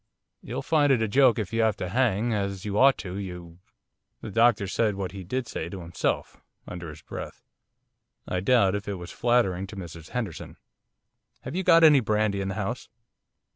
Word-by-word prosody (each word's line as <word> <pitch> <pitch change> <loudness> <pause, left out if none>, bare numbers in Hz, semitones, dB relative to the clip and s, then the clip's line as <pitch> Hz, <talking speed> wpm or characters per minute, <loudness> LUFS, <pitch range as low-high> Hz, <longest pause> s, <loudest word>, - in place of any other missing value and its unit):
'You'll - - -5
find 150 -3 +3
it 120 -4 +3
a - - 0
joke 130 +2 +4
if 105 -2 -4
you 115 - +2
have 110 -2 +2
to 90 - -4
hang, 115 0 +1
as 100 -2 -3
you 100 -1 -3
ought 135 +1 +6
to, 95 -1 -6
you 90 -3 -8 0.3
' - - -53
The 110 - -6
doctor 115 -1 +3
said 105 +2 0
what 95 -2 -4
he 95 0 -8
did 125 +7 -3
say 80 - -5
to 95 - -7
himself, 85 0 -3 0.3
under 90 -2 -7
his 75 0 -12
breath. - - -8 0.8
I 90 - -1
doubt 100 -1 +3
if 105 0 -4
it 100 - -2
was 90 -1 -8
flattering 100 -6 +1
to 105 - -10
Mrs 85 -4 -9
Henderson. 110 -10 -5 0.8
'Have - - -7
you 190 - 0
got 165 -2 +5
any 150 -3 +8
brandy 105 -3 0
in 95 - -3
the 95 - -3
house? - - -4
100 Hz, 200 wpm, -26 LUFS, 95-120 Hz, 0.8 s, any